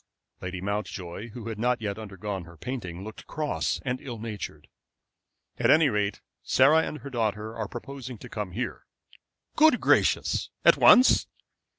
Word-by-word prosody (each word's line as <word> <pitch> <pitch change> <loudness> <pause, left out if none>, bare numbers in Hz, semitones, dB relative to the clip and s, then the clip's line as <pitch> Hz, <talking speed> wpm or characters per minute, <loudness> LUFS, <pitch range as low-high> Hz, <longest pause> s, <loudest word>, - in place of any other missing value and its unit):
Lady 90 0 -5
Mountjoy, 100 0 -4
who 115 0 -8
had 110 -2 -6
not 125 +2 +1
yet 105 -1 -4
undergone 100 -3 -5
her 85 0 -14
painting, 95 -5 -5
looked 110 +1 -10
cross 155 -1 -1
and 125 -1 -2
ill 120 -4 -6
natured. 110 -3 -7 0.9
"At - - +2
any 155 -1 +6
rate, 105 -3 -1 0.2
Sarah 150 +5 +5
and 155 - -4
her 140 - -8
daughter 110 -2 -2
are 110 -2 -3
proposing 130 +2 -8
to - - -11
come 105 -5 -5
here." 120 +6 -4 0.7
"Good 310 -5 +5
gracious! - - +2 0.2
At - - +8
once?" 255 - +6
110 Hz, 155 wpm, -27 LUFS, 100-130 Hz, 0.9 s, At